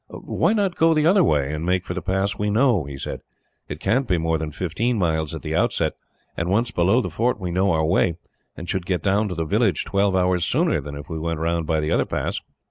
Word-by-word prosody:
"Why - - -1
not 200 -5 0
go 165 0 +4
the 155 0 +2
other 185 +3 +5
way, 75 - +1
and 75 +1 -4
make 90 +1 0
for - - -4
the 90 - -4
pass 95 +4 -1
we 105 0 -1
know?" 110 - +2
he 70 -1 -7
said. - - -5 0.5
"It 75 - -5
can't 130 +8 +1
be 90 -5 +2
more 80 -1 0
than 80 0 -3
fifteen 105 +10 -1
miles, 80 -5 0
at - - -8
the - - -3
outside, - - +1 0.4
and 85 +2 -2
once 115 +5 +1
below 95 +6 +3
the - - -4
fort 120 -1 0
we 90 -2 -4
know 95 +3 +2
our 80 -1 +1
way, 85 0 +2 0.4
and 85 - -7
should 90 -1 -2
get 90 -2 -1
down 105 +2 +2
to 90 - -4
the 80 -1 -2
village 105 0 +1
twelve 100 -1 +1
hours 90 -1 +2
sooner 75 - +1
than 70 +1 -7
if 70 +1 -9
we 80 -3 -5
went 80 0 -2
round 85 0 -1
by 80 -1 +1
the 75 0 -1
other - - +2
pass." - - -2
90 Hz, 250 wpm, -23 LUFS, 80-105 Hz, 0.5 s, other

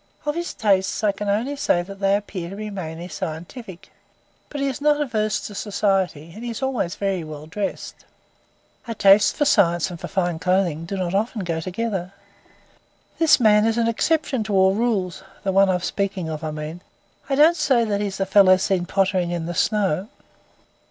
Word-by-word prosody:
Of 295 - 0
his 345 +2 -4
tastes, 195 0 +1
I 210 - +4
can 200 +1 -5
only 235 +8 0
say 175 -10 +1
that 195 +2 -10
they 195 0 +3
appear 195 -4 -5
to 195 - -7
be 210 +1 -6
mainly 170 -3 -6
scientific. 185 +3 -7 0.6
But 290 - -6
he 275 - 0
is 270 +1 -4
not 295 0 +3
averse 215 -7 -1
to 210 - -7
society, 195 -6 -1
and 220 - -9
is 235 +1 -5
always 250 -9 -1
very 195 -3 -2
well 155 -1 -8
dressed." 195 +6 -5 0.8
"A 230 - -4
taste 200 0 +5
for 295 - +1
science 175 - +3
and 170 - -8
for - - -6
fine 175 -3 -1
clothing 180 -3 0
do 195 +3 -4
not 180 -1 -2
often 210 +1 -1
go 165 -2 -2
together." 190 +1 -3 1.1
"This 325 -3 +5
man 210 -3 +5
is 225 0 0
an 230 -1 +2
exception 265 +1 0
to 210 -2 -1
all 190 0 +5
rules. 200 -5 -1 0.2
The 195 - 0
one 195 0 +4
I'm 180 -1 +1
speaking 190 -3 -2
of, 155 0 -5
I 155 - -2
mean. 155 +3 -6 0.5
I 275 - +1
don't 310 +4 +6
say 250 -8 +2
that 205 -2 -1
he's 200 -2 -3
the 195 - 0
fellow 190 -1 +6
seen 185 -1 0
pottering 190 -2 +1
in 170 -2 -3
the 175 - -4
snow." 195 -1 0
195 Hz, 190 wpm, -22 LUFS, 175-220 Hz, 1.1 s, don't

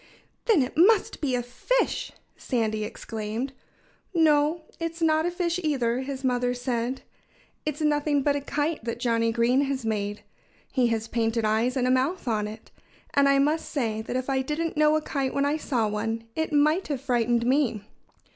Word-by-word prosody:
"Then 400 - +4
it 255 - -5
must 385 +4 +4
be 270 -4 +1
a 245 - -1
fish!" 380 - -1 0.2
Sandy 220 -4 -1
exclaimed. 220 +4 -4 0.6
"No! 310 0 +3 0.2
It's 330 0 -4
not 320 0 +3
a - - +2
fish, 350 0 -1
either," 255 -6 +1
his 270 0 -5
mother 245 -1 +1
said. 245 +1 -2 0.6
"It's 305 +1 -2
nothing 295 -1 +2
but 285 0 +2
a 285 - -1
kite 295 +1 -2
that 230 0 -3
Johnnie 230 -1 +1
Green 240 +3 +3
has 270 -3 -3
made. 205 -1 -2 0.5
He 255 -3 +2
has 225 -1 -1
painted 225 0 0
eyes 225 +5 +1
and 250 -1 +1
a - - +3
mouth 265 +6 0
on 215 -2 0
it. 215 +1 -10 0.4
And 280 0 +4
I 275 - +5
must 300 +4 +1
say 225 -6 -1
that 225 - -5
if 255 0 -2
I 265 -1 +1
didn't 310 +5 -2
know 305 0 +4
a 310 - 0
kite 275 -4 -2
when 280 0 +2
I 290 +2 +1
saw 245 -8 0
one 225 +2 -2
it 320 0 -1
might 305 +5 +3
have 280 -4 -3
frightened 240 -3 +1
me." 250 -5 +1
260 Hz, 185 wpm, -26 LUFS, 230-300 Hz, 0.6 s, I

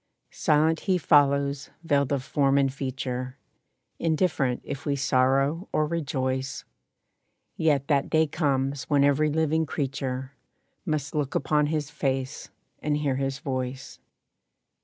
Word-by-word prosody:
Silent 155 +1 +2
he 185 - +4
follows, 140 -3 +3
veiled 145 -4 +1
of 140 -2 0
form 140 0 +2
and 135 -1 +2
feature, 130 -1 -4 0.6
Indifferent 155 -6 +1
if 140 0 -6
we 145 -2 0
sorrow 135 +5 +1
or 155 - +2
rejoice, 135 -4 -2 0.9
Yet 145 -4 +1
that 140 -2 +1
day 160 0 +4
comes 140 -3 -1
when 145 -2 +3
every 145 +2 +3
living 160 +1 +1
creature 135 -2 -3 0.6
Must 150 -3 -2
look 145 -2 -2
upon 150 -1 +2
his 150 -2 -2
face 135 -1 -2 0.3
and 150 -1 0
hear 140 -3 0
his 135 0 -2
voice. 130 -1 -5
140 Hz, 125 wpm, -26 LUFS, 135-150 Hz, 0.9 s, he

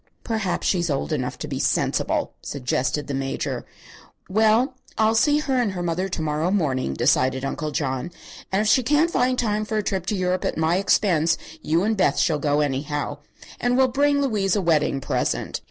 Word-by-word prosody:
"Perhaps 220 -5 -2
she's 175 -3 +1
old 140 +2 -1
enough 130 -4 -2
to - - -6
be - - -4
sensible," - - 0
suggested 130 +1 -2
the 140 - -5
Major. 135 0 -3 0.6
"Well, 220 +6 +3 0.2
I'll 220 0 +3
see 290 +7 +3
her 280 -3 0
and 210 -5 -1
her 175 -1 -4
mother 175 +3 -1
to 165 - -3
morrow 155 +2 0
morning," 135 - 0
decided 130 - +2
Uncle 150 +2 -3
John, 140 0 -2 0.4
"and 195 +2 +2
if - - -1
she 220 +5 +5
can't 295 +6 +2
find 255 -2 +1
time 215 -3 0
for 215 0 -3
a 210 - 0
trip 190 -3 -2
to 210 - 0
Europe 185 -1 0
at - - -2
my 160 +2 +2
expense, 180 -5 +2 0.2
you 165 +4 +1
and 220 +2 +1
Beth 180 -8 +2
shall 155 -4 +2
go 145 0 +1
anyhow 145 +1 -2 0.4
and 245 +1 +1
we'll 260 -1 +4
bring 285 +2 +2
Louise 205 -7 +1
a 205 - +1
wedding 150 -4 +2
present." - - -2
180 Hz, 190 wpm, -23 LUFS, 150-220 Hz, 0.6 s, she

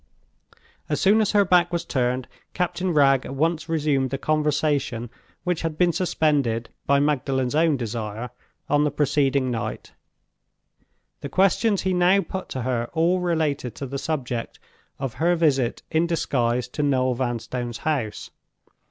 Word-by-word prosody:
As - - 0
soon 205 +3 +4
as 215 - 0
her 205 -1 +5
back 175 -1 +3
was 170 -1 -2
turned, 125 -1 -1 0.3
Captain 180 +1 -1
Wragge 135 -4 +4
at 135 - -6
once 160 +3 0
resumed 145 -5 +1
the 135 - -2
conversation 145 -5 0 0.3
which 180 -3 -1
had 160 -2 -3
been 175 -1 +3
suspended, 145 - 0 0.2
by 140 0 +4
Magdalen's 135 -3 0
own 155 -1 +3
desire, 115 0 -4 0.4
on 145 0 +3
the 150 - +2
preceding 140 -2 +1
night. 115 -2 -4 1.3
The - - -6
questions 195 +2 +2
he 190 0 +1
now 180 +2 +4
put 190 -1 -6
to 130 - -4
her 120 -2 -1
all 170 +3 +2
related 160 -8 -1
to 140 - -5
the 135 +1 -4
subject 125 -7 -3 0.4
of 135 -4 -4
her 175 +2 +2
visit 140 -7 +1
in 160 +1 +2
disguise 125 -7 0
to 150 - -3
Noel 130 -3 +2
Vanstone's 120 -1 -3
house. 130 -9 -3
145 Hz, 150 wpm, -24 LUFS, 125-170 Hz, 1.3 s, her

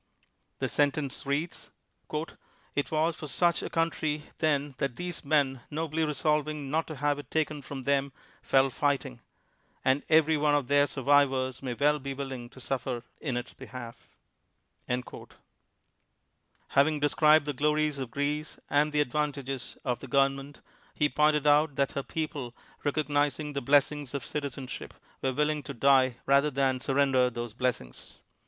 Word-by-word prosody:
The - - -1
sentence 145 -1 0
reads: 150 +5 -2 0.4
' 155 +2 -5
' - - -34
It 145 - 0
was 160 +1 +1
for 155 - -7
such 170 +4 +2
a - - -4
country 155 -2 -1
then 145 -3 +1
that 135 -3 -1
these 175 -1 -4
men, 140 -3 +2
nobly 160 +1 -1
resolving 150 -1 0
not 160 +2 0
to 155 - -6
have 145 +1 0
it 145 - -10
taken 155 -2 -1
from 135 -1 -7
them, 140 0 +1 0.3
fell 135 0 +3
fighting; 140 -2 -1 0.7
and 130 +2 +3
every 160 0 +5
one 145 0 +3
of 140 -4 0
their 145 0 +5
survivors 135 -2 +2
may 125 -3 -3
well 150 +3 +3
be 135 0 -5
willing 130 -3 -6
to 130 - -15
suffer 125 -2 -3 0.2
in 130 -5 -2
its 120 - -5
behalf." 120 -2 -10 0.8
Having 125 0 -4 1.7
described 150 +1 +4
the 145 - -2
glories 150 +1 +1
of 130 -3 -4
Greece 145 +3 -2
and 150 +1 +3
the 150 0 +2
advantages 140 -2 -2
of 125 -2 -1
the 135 - -9
government, 135 +1 0 0.3
he 150 - +2
pointed 150 0 +2
out 150 0 +4
that 140 0 +1
her 140 - -2
people, 145 -5 -4 0.3
recognizing 145 0 0
the 140 - -2
blessings 145 +1 +2
of 140 - -3
citi 145 -1 -3
zenship, 130 -1 -7 0.3
were 130 - +1
willing 150 +2 +1
to 130 - -8
die 130 -1 +4
rather 140 +2 +4
than 135 -2 +1
surren 135 +1 +2
der 125 -1 +4
those 120 -2 -5
blessings. 120 - -3
145 Hz, 160 wpm, -29 LUFS, 135-150 Hz, 1.7 s, every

